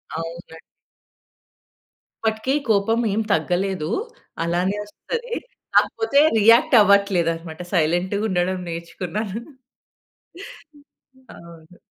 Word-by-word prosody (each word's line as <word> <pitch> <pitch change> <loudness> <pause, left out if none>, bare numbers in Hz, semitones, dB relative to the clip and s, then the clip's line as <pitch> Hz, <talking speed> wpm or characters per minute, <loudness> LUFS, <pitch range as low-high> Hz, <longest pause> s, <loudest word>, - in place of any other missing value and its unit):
అవునండి. 165 0 -7 1.7
అప్పటికి 220 +4 0 0.2
కోపం 220 +2 +2
ఏం 220 - 0
తగ్గలేదు. 180 0 -1 0.5
అలానే 175 +4 0
ఒస్తది. 470 - -6 0.4
కాకపోతే 365 -11 +3 0.2
రియాక్ట్ 230 +7 +5
అవ్వట్లేదనమాట. 175 -5 +1
సైలెంట్‌గా 175 +4 +1
ఉండడం 185 0 0
నేర్చుకున్నాను. 180 +6 -5 1.3
హ్మ్. 290 -1 -20 0.3
హ్మ్. 260 - -24
అవును. 170 0 -15
190 Hz, 80 wpm, -22 LUFS, 170-220 Hz, 1.7 s, రియాక్ట్